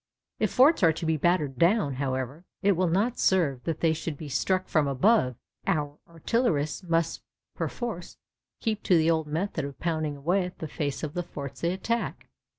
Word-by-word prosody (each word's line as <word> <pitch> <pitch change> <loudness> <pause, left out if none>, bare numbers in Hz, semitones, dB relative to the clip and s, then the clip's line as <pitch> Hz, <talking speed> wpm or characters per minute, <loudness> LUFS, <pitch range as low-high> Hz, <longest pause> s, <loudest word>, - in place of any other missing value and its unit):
If - - +1
forts 280 +4 +5
are 165 -3 +6
to 160 - -5
be 160 0 +2
battered 150 -5 +1
down, 170 -5 +3
however, 130 +3 -3 0.2
it 200 - +5
will 185 -1 +2
not 205 +9 +1
serve 150 -9 +2
that 165 -2 -2
they 165 -1 +3
should 155 -1 -4
be 150 -1 -7
struck 185 +7 0
from 155 -3 +2
above; 135 - +3 0.3
our 150 -6 -1
artillerists 165 - 0
must 165 -2 0 0.3
perforce 225 -8 -4 0.4
keep 215 -2 -1
to 180 - +4
the 160 +1 +4
old 160 -2 0
method 160 +1 -2
of 140 -2 -7
pounding 155 -3 -1
away 175 +7 +1
at 180 - -8
the 160 - -5
face 145 -1 -3
of 150 -1 -3
the 175 - -1
forts 140 -6 -8
they 170 - +1
attack. 230 +5 -2
165 Hz, 185 wpm, -27 LUFS, 145-185 Hz, 0.4 s, are